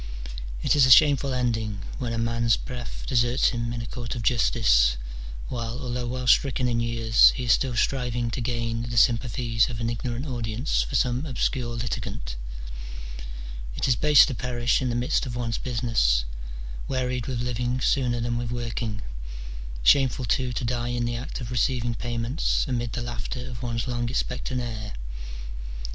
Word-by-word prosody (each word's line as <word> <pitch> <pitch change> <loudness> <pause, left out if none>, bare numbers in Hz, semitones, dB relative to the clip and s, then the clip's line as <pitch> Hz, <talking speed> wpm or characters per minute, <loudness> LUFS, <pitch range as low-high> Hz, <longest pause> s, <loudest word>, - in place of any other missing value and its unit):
It - - +3
is 135 -3 +6
a - - +1
shameful 140 +1 +6
ending, 110 -5 -1 0.2
when 120 -3 -2
a 115 - -2
man's 115 0 +2
breath 125 -1 -6
deserts 120 0 +3
him 115 -1 -2
in 120 -1 -3
a - - -6
court 120 -1 -5
of 115 - -4
justice, 80 - +4 0.5
while, 115 -1 -3
although 125 -2 -3
well 125 +1 -3
stricken 130 0 +4
in 120 -1 +1
years, 115 -1 +5
he 130 - -3
is 120 - +2
still 130 +1 +2
striving 120 -1 0
to 125 - -3
gain 115 -1 -1
the 120 0 -4
sympa 120 +1 +4
thies 115 0 +1
of 115 -2 -5
an 115 0 0
ignorant 120 +3 -3
audience 120 0 -1
for 135 - -3
some 125 +4 +1
obscure 125 -2 -1
litigant: 115 - -4 1.4
it - - 0
is 125 - +4
base 150 +4 +7
to 140 - -3
perish 120 0 0
in 130 - 0
the 120 - -1
midst 125 +3 +1
of 120 - -5
one's 120 -2 -2
business, 115 - +1 0.6
wearied 125 -2 -1
with 120 -2 -2
living 125 +1 -1
sooner 125 -2 +2
than 120 0 -1
with 120 -1 -3
working; 115 -2 -3 0.8
shameful, 130 - +4
too, 125 +3 +1
to 120 - -2
die 120 0 -1
in 120 0 -1
the 120 0 -1
act 120 +3 -5
of 120 0 -6
receiving 120 0 +1
payments, 120 +4 0
amid 120 -4 -2
the 120 - -2
laughter 120 +2 -5
of 120 -2 -7
one's 115 -1 -2
long 120 -1 -1
expectant 125 0 -2
heir. 110 -3 -5
120 Hz, 175 wpm, -26 LUFS, 115-125 Hz, 1.4 s, base